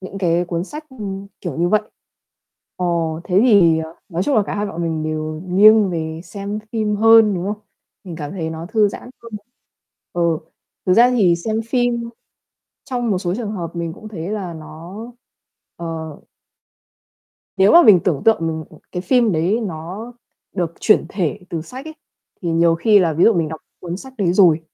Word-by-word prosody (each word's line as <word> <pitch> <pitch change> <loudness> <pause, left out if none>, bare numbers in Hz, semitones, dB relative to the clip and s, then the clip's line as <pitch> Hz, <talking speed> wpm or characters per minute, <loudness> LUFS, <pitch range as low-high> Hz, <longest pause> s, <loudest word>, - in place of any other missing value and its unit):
những 190 +1 -8
cái 175 -2 +1
cuốn 170 0 -2
sách, 300 +9 -8
ừm, 200 -5 -6
kiểu 170 -7 -5
như 170 +2 +1
vậy. 215 +3 +3 1.0
Ờ, 180 - -1 0.4
thế 185 +2 +3
thì, 185 -9 +5
ờ, 160 0 -6
nói 175 -1 -2
chung 285 - 0
là 215 - +4
cả - - -3
hai 205 +1 -1
bọn 170 -4 -5
mình 160 -2 -2
đều 155 0 -3
nghiêng 205 +2 +6
về 160 -1 -4
xem 200 +1 -5
phim 215 -2 0
hơn, 225 -1 +6
đúng 175 -1 -3
không? 210 +1 -3 0.4
Mình 175 -4 -7
cảm 145 -3 -6
thấy 165 -4 -4
nó 160 +1 -6
thư 215 -1 +3
giãn 245 - -9
hơn. 230 -1 -12 0.8
Ừ, 170 -2 +1 0.5
thực 185 - +4
ra 240 +4 +6
thì 200 -9 +3
xem 220 +5 -2
phim 240 -1 0 0.7
trong 245 -3 -2
một 190 - +1
số 180 -1 -2
trường 215 -1 -4
hợp 170 -4 -6
mình 170 -1 -3
cũng 215 +5 -11
thấy 175 -5 -6
là 195 -5 -4
nó 160 +3 -10 0.8
ờ. 170 - -7 1.7
Nếu 195 +1 +5
mà 345 - +9
mình 200 - +7
tưởng 160 -7 0
tượng 225 0 +5
m 160 -1 -3 0.3
cái 180 - -3
phim 235 +2 +3
đấy 175 +8 +1
nó 190 +5 -6 0.4
được 175 -4 -2
chuyển 215 - +4
thể 190 -2 -2
từ 165 -2 -3
sách 255 - -9
ấy, 315 - -8 0.5
thì 175 - -2
nhiều 165 0 +3
khi 210 +5 +4
là 175 -4 +2
ví 160 +3 +3
dụ 230 - +5
mình 165 -3 0
đọc 160 0 -7 0.2
cuốn 175 0 -5
sách 265 +7 -11
đấy 180 -4 +2
rồi 175 -4 +5
185 Hz, 190 wpm, -19 LUFS, 165-215 Hz, 1.7 s, mà